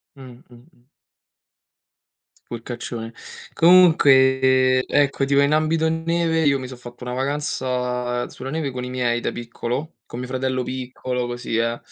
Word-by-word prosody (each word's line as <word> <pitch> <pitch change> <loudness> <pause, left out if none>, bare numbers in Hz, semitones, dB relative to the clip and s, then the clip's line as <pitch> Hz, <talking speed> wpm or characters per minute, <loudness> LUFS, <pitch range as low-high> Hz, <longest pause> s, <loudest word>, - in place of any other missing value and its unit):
Mh, 135 - -13
mh, 125 0 -14
mh. 120 0 -22 1.6
Sporcaccione. 120 -1 -6 0.4
Comunque, 130 -7 +5
ehm, - - 0
ecco, 140 -1 +2
tipo 140 0 +3
in 140 - +2
ambito 155 +1 +2
neve 165 -1 0
io 140 -1 +3
mi 130 - -6
so' 130 - -9
fatto 120 0 -11
una 125 - -5
vacanza 125 -3 -2
sulla 130 - -8
neve 150 -1 -2
con 125 0 -5
i - - -5
miei 125 -2 -1
da - - -2
piccolo, 120 +5 -5
con 120 - -8
mio 125 - -5
fratello 130 0 -1
piccolo 125 -1 -4
così 120 -2 -3
eh, 115 +1 0
130 Hz, 150 wpm, -22 LUFS, 125-140 Hz, 1.6 s, Comunque